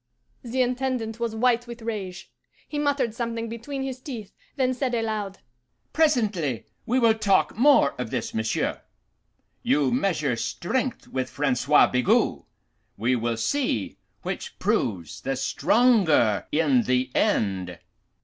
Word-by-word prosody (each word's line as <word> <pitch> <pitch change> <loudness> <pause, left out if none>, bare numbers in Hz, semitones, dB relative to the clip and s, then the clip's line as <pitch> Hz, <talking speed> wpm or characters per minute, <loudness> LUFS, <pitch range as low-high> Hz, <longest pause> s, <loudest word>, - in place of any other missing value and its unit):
"The 255 +1 0
Intendant 250 -3 -2
was 230 -2 -2
white 240 +1 +2
with 235 -1 -9
rage. 195 -5 -5 0.4
He 295 - -4
muttered 280 -6 0
something 230 -1 -3
between 240 +5 -5
his 265 -1 -5
teeth, 230 -8 -7 0.2
then 260 -2 +1
said 255 -1 -1
aloud, 215 -4 -2 0.6
'Presently 215 - +1 0.2
we 245 - +2
will 230 -3 +5
talk 205 -3 +2
more 250 - +5
of 125 -3 -3
this, 125 -2 -3
monsieur. 110 0 -1 0.8
You 140 -3 +2
measure 145 -1 +1
strength 240 - -2
with 130 -1 -3
Francois 140 +1 +3
Bigot: 125 -1 +2 0.6
we 120 +4 +1
will 115 -1 -1
see 245 - -1 0.2
which - - -5
proves 85 -8 -1
the 135 0 -2
stronger 155 - +3
in 145 -5 +3
the 125 +1 0
end. 95 -4 0
215 Hz, 130 wpm, -25 LUFS, -, 0.8 s, will